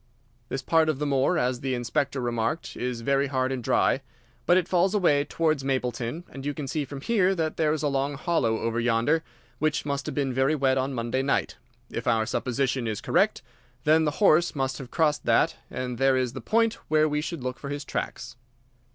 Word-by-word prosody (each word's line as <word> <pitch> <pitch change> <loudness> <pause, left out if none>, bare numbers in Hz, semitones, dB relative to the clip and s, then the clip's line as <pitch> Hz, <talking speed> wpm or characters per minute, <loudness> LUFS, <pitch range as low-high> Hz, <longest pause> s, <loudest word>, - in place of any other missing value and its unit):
This 135 0 -3
part 160 +2 +3
of 155 - 0
the 150 - -2
moor, 140 +4 +2
as 125 0 0
the 130 0 -1
Inspector 130 +3 -1
remarked, 120 +4 -2
is 125 -1 -3
very 140 +3 +1
hard 130 -1 0
and 130 -2 -3
dry. 135 - +2 0.5
But 175 - +6
it 185 -2 +1
falls 185 +3 +2
away 145 -8 +3
towards 155 -4 0
Mapleton, 125 +2 -2
and 135 - -8
you 145 0 -3
can 145 -3 -5
see 150 +2 -2
from 135 0 -8
here 195 -1 +2
that 160 -3 -2
there 155 -2 +2
is 155 0 -2
a - - +2
long 140 +1 -1
hollow 135 -7 0
over 115 0 -1
yonder, 120 +6 +2 0.4
which 155 -2 0
must 140 -1 -2
have - - -4
been 135 -3 0
very 135 +4 +2
wet 135 -2 +2
on 135 +1 -1
Monday 120 +2 -1
night. 140 +1 0 0.3
If - - -4
our 110 -1 +3
supposition 130 +1 -1
is 110 -2 -2
correct, - - +1 0.4
then 160 +1 +4
the 150 -1 -1
horse 175 -6 +4
must 135 -1 -2
have 130 -3 -8
crossed 150 -1 +1
that, - - +3
and 125 -2 -4
there 135 -1 +4
is 125 -2 -1
the - - -6
point 230 0 +1
where 155 0 +3
we 150 0 -1
should 160 -3 -5
look 130 0 -4
for 140 - -6
his 145 0 -4
tracks." - - -4
140 Hz, 210 wpm, -26 LUFS, 130-155 Hz, 0.5 s, But